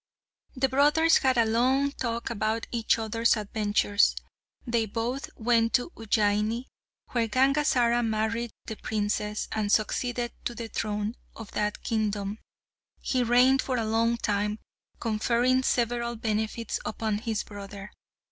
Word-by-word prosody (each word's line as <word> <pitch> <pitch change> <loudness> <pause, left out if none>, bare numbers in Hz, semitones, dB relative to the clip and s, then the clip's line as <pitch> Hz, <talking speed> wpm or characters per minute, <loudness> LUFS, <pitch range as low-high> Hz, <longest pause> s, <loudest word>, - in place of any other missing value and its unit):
The 265 +1 +2
brothers 295 +5 +4
had 260 -2 +2
a 230 - +5
long 260 +5 +2
talk 235 -4 -3
about 220 0 -1
each 230 -2 +1
other's 230 +1 +1
adventures. 205 0 +1 0.5
They 235 -3 0
both 235 +6 -3
went 230 0 +2
to 250 +7 +1
Ujjaini, 215 - 0 0.5
where 235 -2 +1
Gangazara 255 -2 +3
married 225 +1 -1 0.2
the 220 - -6
princess, 210 0 -2
and 210 -2 -1
succeeded 240 +3 0
to 240 - -2
the 230 -1 -6
throne 210 0 -2 0.2
of 225 -2 -9
that 210 0 -2
kingdom. 210 -2 -1 0.6
He 255 - 0
reigned 250 +2 +4
for 255 -2 -2
a 225 - 0
long 230 +2 +1
time, 210 -1 -1 0.4
conferring 235 +3 +2
several 235 -1 0
benefits 220 0 -2
upon 215 -1 -2
his 220 -2 -2
brother. 200 -1 -9
230 Hz, 130 wpm, -27 LUFS, 215-245 Hz, 0.6 s, a